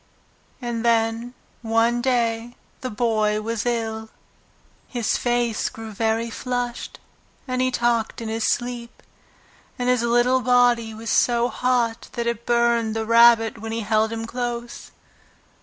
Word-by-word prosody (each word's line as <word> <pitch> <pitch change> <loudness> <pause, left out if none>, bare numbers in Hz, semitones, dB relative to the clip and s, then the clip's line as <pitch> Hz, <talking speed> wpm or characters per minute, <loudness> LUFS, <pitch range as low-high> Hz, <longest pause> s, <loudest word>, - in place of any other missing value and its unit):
And 235 -1 -3
then, 230 +1 +1 0.3
one 230 +1 +2
day, 240 -2 0 0.2
the 255 - -4
Boy 215 -2 +1
was 225 +1 -3
ill. 220 -2 -2 0.8
His 240 -3 -1
face 240 -2 0
grew 225 -1 -9
very 225 +2 -1
flushed, 245 0 -4 0.5
and 255 0 -1
he 255 - +2
talked 235 -3 0
in 230 - -5
his 220 0 -1
sleep, 240 -1 -3 0.7
and 245 0 -1
his 250 -2 +3
little 240 +2 +3
body 245 -2 +3
was 225 0 -5
so 240 0 +3
hot 245 -3 0
that 235 - -3
it 235 0 -3
burned 235 -2 +2
the 220 0 -2
Rabbit 230 -1 +5
when 225 +1 -6
he 230 +1 -2
held 220 +1 +1
him 225 0 -4
close. 240 0 -5
235 Hz, 140 wpm, -23 LUFS, 225-240 Hz, 0.8 s, Rabbit